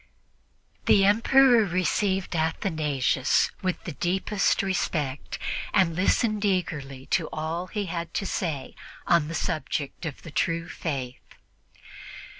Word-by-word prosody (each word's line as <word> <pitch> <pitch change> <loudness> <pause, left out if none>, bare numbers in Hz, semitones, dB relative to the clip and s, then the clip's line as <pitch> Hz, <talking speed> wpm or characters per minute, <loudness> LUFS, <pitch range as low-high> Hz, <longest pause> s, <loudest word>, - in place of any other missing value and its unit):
The 195 -1 +6
Emperor 235 +3 +5
received 190 0 0
Athanasius 155 -5 +1
with 185 -1 -2
the 170 - -5
deepest 190 +7 0
respect 150 -7 -2 0.4
and 175 -4 +3
listened 210 +3 +1
eagerly 145 -9 -2
to 160 - +1
all 160 +3 -3
he 205 +1 -3
had 170 -1 -4
to 195 - -1
say 155 -9 -3 0.3
on 170 -3 +3
the 165 - -5
subject 155 -1 -3
of 145 - -8
the 165 - -9
true 165 +2 0
Faith. 130 -8 -4
170 Hz, 115 wpm, -26 LUFS, 155-195 Hz, 0.4 s, The